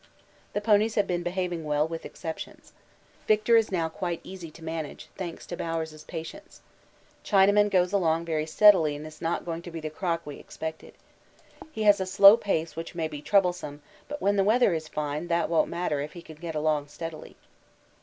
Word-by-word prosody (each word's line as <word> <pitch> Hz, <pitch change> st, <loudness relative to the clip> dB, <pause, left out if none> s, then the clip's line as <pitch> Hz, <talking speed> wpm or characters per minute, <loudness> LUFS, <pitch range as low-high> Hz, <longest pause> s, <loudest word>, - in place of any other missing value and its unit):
The 205 Hz, -, -1 dB
ponies 215 Hz, +1 st, +3 dB
have 205 Hz, -, +3 dB
been 175 Hz, -1 st, -1 dB
behaving 175 Hz, -1 st, -2 dB
well, 150 Hz, 0 st, +1 dB
with 165 Hz, 0 st, -6 dB
exceptions. 160 Hz, -1 st, -8 dB, 0.5 s
Victor 215 Hz, +2 st, +4 dB
is 225 Hz, -2 st, +3 dB
now 170 Hz, -3 st, 0 dB
quite 170 Hz, +1 st, -4 dB
easy 185 Hz, -3 st, -9 dB
to 160 Hz, +1 st, -15 dB
manage, 160 Hz, -2 st, -6 dB
thanks 175 Hz, -3 st, -6 dB
to 175 Hz, -, -6 dB
Bowers' 160 Hz, -2 st, -4 dB
patience. 245 Hz, -, -8 dB, 0.6 s
Chinaman 205 Hz, +1 st, +4 dB
goes 180 Hz, -1 st, +2 dB
along 165 Hz, -4 st, +1 dB
very 155 Hz, -2 st, -1 dB
steadily 165 Hz, -4 st, +5 dB
and 150 Hz, +1 st, -8 dB
is 155 Hz, 0 st, -11 dB
not 165 Hz, +1 st, -1 dB
going 165 Hz, -1 st, -4 dB
to 175 Hz, -, -9 dB
be 165 Hz, -1 st, -6 dB
the 155 Hz, -1 st, -5 dB
crock 170 Hz, 0 st, -2 dB
we 145 Hz, -1 st, -7 dB
expected. 160 Hz, 0 st, -8 dB, 0.8 s
He 220 Hz, -, -3 dB
has 205 Hz, -1 st, +6 dB
a 190 Hz, -, -2 dB
slow 195 Hz, +2 st, +8 dB
pace 170 Hz, -8 st, -2 dB
which 165 Hz, +1 st, -7 dB
may 165 Hz, -2 st, -1 dB
be 150 Hz, -2 st, -8 dB
troublesome, 175 Hz, -6 st, 0 dB, 0.2 s
but 290 Hz, 0 st, -5 dB
when 200 Hz, +1 st, +2 dB
the 195 Hz, -, +4 dB
weather 220 Hz, -1 st, +4 dB
is 160 Hz, -1 st, -3 dB
fine 150 Hz, +2 st, -3 dB
that 170 Hz, 0 st, +1 dB
won't 165 Hz, -, +3 dB
matter 170 Hz, -4 st, -1 dB
if 145 Hz, +2 st, -5 dB
he 175 Hz, -, -10 dB
can 160 Hz, -2 st, -12 dB
get 165 Hz, 0 st, -6 dB
along 150 Hz, -1 st, 0 dB
steadily. 160 Hz, +1 st, -8 dB
170 Hz, 195 wpm, -27 LUFS, 160-195 Hz, 0.8 s, slow